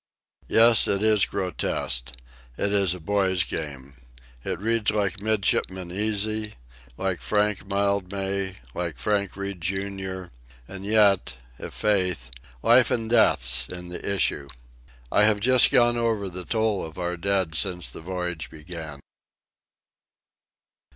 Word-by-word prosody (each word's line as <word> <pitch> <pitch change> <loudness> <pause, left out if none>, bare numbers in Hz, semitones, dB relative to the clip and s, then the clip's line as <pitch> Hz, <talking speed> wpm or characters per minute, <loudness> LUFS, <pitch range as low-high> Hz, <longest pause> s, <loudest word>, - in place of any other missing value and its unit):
Yes; 115 0 +5
it 100 +1 0
is 110 -3 +4
grotesque. 65 -9 -2 0.4
It 100 - -1
is 95 -3 +3
a - - -9
boy's 95 0 +1
game. 70 -6 -6 0.5
It - - -3
reads 110 +3 0
like 100 -3 -1
Midshipman 95 -4 0
Easy, 110 +2 -1 0.4
like 95 -2 -2
Frank 105 -2 0
Mildmay, 100 -1 0 0.2
like 85 -2 -4
Frank 100 -2 -1
Reade, 100 -2 -4
Jr.; 95 -1 -4 0.3
and 95 +1 -7
yet, 105 - +3 0.2
i' - - -6
faith, 90 - 0 0.3
life 120 +2 +6
and 115 -1 -2
death's 65 - +4
in 90 -1 -8
the 90 - -6
issue. 80 -7 0 0.6
I 105 - +5
have 105 -1 +3
just 130 +4 +5
gone 120 -3 +4
over 110 -4 0
the 90 0 -6
toll 110 -2 0
of 80 0 -9
our 90 -1 -2
dead 95 -2 0
since 90 +1 -1
the - - -9
voyage 90 -2 -4
began. 80 -2 -8
95 Hz, 130 wpm, -25 LUFS, 90-105 Hz, 0.6 s, life